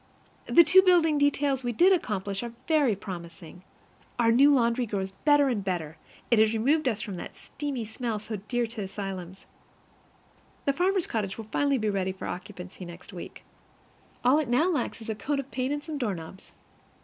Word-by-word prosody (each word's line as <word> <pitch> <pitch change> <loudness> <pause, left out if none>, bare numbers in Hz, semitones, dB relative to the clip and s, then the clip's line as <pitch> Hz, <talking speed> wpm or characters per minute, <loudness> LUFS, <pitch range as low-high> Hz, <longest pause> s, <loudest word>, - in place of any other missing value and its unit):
The 340 - +7
two 370 +4 +7
building 340 -5 +4
details 285 -2 +1
we 240 0 -1
did 365 - +5
accomplish 200 - -2
are 235 -1 -6
very 295 -9 +3
promising. 175 -3 -9 0.6
Our 230 -1 +4
new 275 +5 +6
laundry 240 -2 +2
grows 195 -2 -3
better 290 +6 +3
and 230 -6 -1
better; 170 -5 -3 0.4
it 235 - +5
has 220 0 +4
removed 280 +8 +2
from 215 -4 -2
us - - -6
that - - -9
steamy 275 -5 -5
smell 225 0 -3
so 215 +1 -5
dear 245 -1 0
to 225 -1 -7
asylums. 190 -2 -6 1.2
The 280 - +2
farmer's 370 +3 +1
cottage 200 -4 -3
will 225 - -7
finally 280 -1 +2
be 215 -3 0
ready 190 -1 -1
for 190 - -8
occupancy 185 0 -7
next 175 +2 -11
week. 175 - -9 0.8
All 265 +5 +5
it 295 -6 -2
now 310 +10 +3
lacks 300 -7 -2
is 220 - -9
a - - -1
coat 280 +7 -2
of 275 -1 -6
paint 260 +1 -2
and 290 0 -2
some 310 -3 -5
doorknobs. 190 - -5
230 Hz, 185 wpm, -27 LUFS, 195-285 Hz, 1.2 s, The